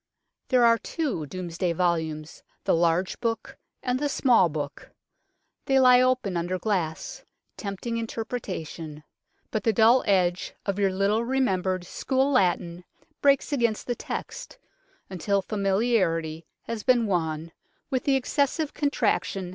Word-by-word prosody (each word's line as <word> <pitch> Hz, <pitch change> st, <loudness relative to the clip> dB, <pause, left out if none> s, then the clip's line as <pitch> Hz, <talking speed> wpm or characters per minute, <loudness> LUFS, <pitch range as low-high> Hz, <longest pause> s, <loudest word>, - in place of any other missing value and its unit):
There 250 Hz, -2 st, +4 dB
are 230 Hz, 0 st, +5 dB
two 275 Hz, -, -3 dB
Domesday 175 Hz, 0 st, -3 dB
volumes, 160 Hz, -3 st, -1 dB, 0.2 s
the -, -, +2 dB
large 170 Hz, +2 st, +1 dB
book 230 Hz, -1 st, -3 dB, 0.3 s
and 250 Hz, 0 st, 0 dB
the 290 Hz, 0 st, 0 dB
small 240 Hz, -10 st, +4 dB
book. 145 Hz, -2 st, -6 dB, 0.8 s
They 270 Hz, -1 st, +4 dB
lie 250 Hz, -1 st, +7 dB
open 255 Hz, -7 st, +1 dB
under 175 Hz, +2 st, -1 dB
glass, 180 Hz, -5 st, -2 dB, 0.3 s
tempting 210 Hz, +3 st, -4 dB
interpretation, 185 Hz, -10 st, -5 dB, 0.5 s
but 215 Hz, -, -2 dB
the 225 Hz, -, +3 dB
dull 225 Hz, +4 st, +5 dB
edge 180 Hz, -3 st, +1 dB
of 200 Hz, 0 st, -1 dB
your 195 Hz, -1 st, +2 dB
little 200 Hz, +4 st, +1 dB
remembered 190 Hz, -8 st, 0 dB
school 265 Hz, +8 st, 0 dB
Latin 175 Hz, -6 st, +1 dB, 0.4 s
breaks 280 Hz, +1 st, +3 dB
against 235 Hz, -5 st, 0 dB
the 245 Hz, -, -1 dB
text, 370 Hz, -, -6 dB, 0.5 s
until 195 Hz, +2 st, -1 dB
familiarity 190 Hz, -6 st, 0 dB, 0.2 s
has 230 Hz, -2 st, -4 dB
been 245 Hz, -1 st, +3 dB
won 165 Hz, -4 st, -1 dB, 0.4 s
with 260 Hz, -1 st, -1 dB
the 275 Hz, -, +3 dB
excessive 280 Hz, +3 st, 0 dB
contraction 200 Hz, -9 st, 0 dB
200 Hz, 130 wpm, -26 LUFS, 175-250 Hz, 0.8 s, lie